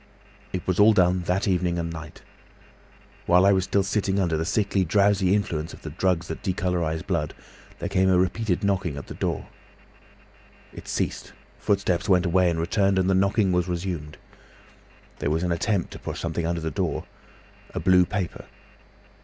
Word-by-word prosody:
"It 90 - -4
was 95 0 0
all 110 +2 +7
done 90 -2 +3
that 90 +3 0
evening 90 -2 +1
and 85 -1 -3
night. 80 -1 -10 1.0
While 90 +2 +5
I 100 - +6
was 95 -1 +2
still 100 0 +1
sitting 100 0 0
under 85 -4 +1
the 80 +1 -1
sickly, 100 0 +1
drowsy 100 +1 +3
influence 85 -5 -2
of - - -13
the - - -6
drugs 90 0 0
that - - -6
decolourise 90 -4 -1
blood, 85 -6 -2 0.4
there - - -4
came 95 0 +2
a 90 - +4
repeated 95 +1 0
knocking 95 -7 0
at 70 - -7
the - - -8
door. - - -2 1.3
It - - -11
ceased, - - -3 0.3
footsteps 100 -1 0
went 90 -1 +4
away 90 +1 +3
and 85 -1 -1
returned, 95 +3 +1
and 95 0 +2
the - - +3
knocking 100 +1 +2
was 90 0 +1
resumed. 85 -4 -4 1.0
There - - -1
was 80 +3 0
an 90 - 0
attempt 95 +3 0
to - - -9
push - - -6
something 85 0 -2
under 85 0 -2
the 80 0 -3
door—a - - -6
blue 90 -1 +4
paper. 95 -3 -4
90 Hz, 175 wpm, -25 LUFS, 85-95 Hz, 1.3 s, all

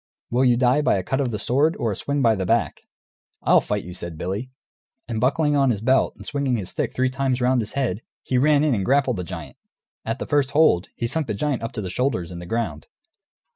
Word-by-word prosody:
Will 125 +2 +2
you 125 -2 +4
die 125 +3 +3
by - - +2
a 95 - -2
cut 135 +8 -1
of 130 - 0
the 110 - -3
sword, 140 +9 +2
or 115 - -1
a - - -3
swing 140 +4 -1
by 115 -1 +5
the 95 -3 -2
back?" 115 +4 0 0.6
"I'll - - +5
fight - - -2
you," 90 - -8
said 85 -3 -6
Billy. 100 +10 -4 0.6
And 115 -2 -3
buckling 150 +3 +2
on 135 -2 +3
his 110 -5 0
belt 130 +5 +2
and - - -12
swinging 140 -4 -1
his 95 -4 -4
stick - - -3
three 130 0 +1
times 135 -1 0
round 125 0 +2
his 110 - -6
head, 120 -7 -1 0.2
he 125 - +1
ran 150 +1 +4
in 150 -3 +2
and 100 -4 0
grappled 130 -1 +2
the 90 - -3
giant. 85 - -8 0.5
At 115 +2 -3
the - - -5
first 140 -2 +1
hold, 145 - +4
he 120 - -3
sunk 145 +5 0
the 105 - -2
giant 140 +3 -1
up 115 - -4
to 110 - -4
the 90 - -4
shoulders 115 -10 -1
in 85 - -7
the 85 - -9
ground. 95 -9 -3
125 Hz, 250 wpm, -23 LUFS, 105-140 Hz, 0.6 s, by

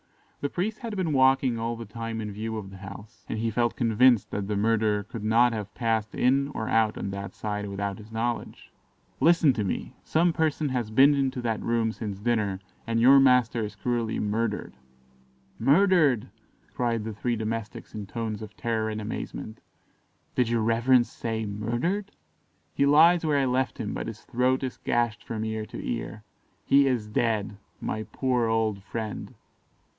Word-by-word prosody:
The 145 - -2
priest 210 +7 -2
had 230 -4 -5
been 180 -6 -1
walking 130 -2 +3
all 115 +1 -2
the 115 0 -7
time 115 +1 -5
in 105 -1 -4
view 110 +2 -4
of 95 -3 -7
the 95 - -10
house, 100 +3 -11
and - - -2
he 115 +1 -1
felt 120 +1 +1
convinced 120 -1 +3
that 100 -1 -3
the 105 - -1
murderer 105 0 +2
could 110 +1 -8
not 115 +2 +4
have 105 -2 -5
passed 115 -2 -1
in 135 +2 +3
or 110 - -3
out 110 -1 +2
on 100 - -3
that 100 0 -6
side 105 -1 -3
without 100 0 -3
his 110 +1 -13
knowledge. 115 +1 -3 0.5
"Listen 165 -4 +5
to 110 - -1
me; 95 - -3
some 170 +2 +2
person 155 -2 0
has 125 -4 -2
been 135 +6 +6
into 135 -2 0
that 115 -2 -1
room 115 -1 +1
since 105 -3 -5
dinner, 105 -3 0 0.3
and 115 0 +1
your 135 +4 +7
master 125 -3 +4
is 105 - -5
cruelly 120 -2 -1
murdered." 105 +1 -2 0.9
"Murdered!" 145 - +4 0.5
cried 115 -3 -1
the 110 0 -5
three 120 +3 -1
domestics 110 0 -5
in 105 -2 -6
tones 110 0 -4
of 110 0 -10
terror 110 -2 -1
and 110 0 -3
amazement; 110 +1 -6 0.7
"did 125 -2 +1
your 115 -2 +1
reverence 120 +2 +3
say 110 -1 -3
'murdered'?" 120 - -2 0.6
"He 140 - +2
lies 165 +4 +6
where 150 -2 +2
I 135 - +2
left 130 0 0
him, - - -3
but - - -4
his - - -7
throat 130 +2 0
is 130 - -4
gashed 120 -1 0
from 110 -1 -4
ear 110 -1 -3
to - - -8
ear 110 -2 -4 0.4
he 140 0 +5
is 125 -5 0
dead. 105 -2 -1 0.2
My 110 0 -4
poor 125 -3 +1
old 110 -3 0
friend!" 110 +1 -6
115 Hz, 180 wpm, -27 LUFS, 110-130 Hz, 0.9 s, your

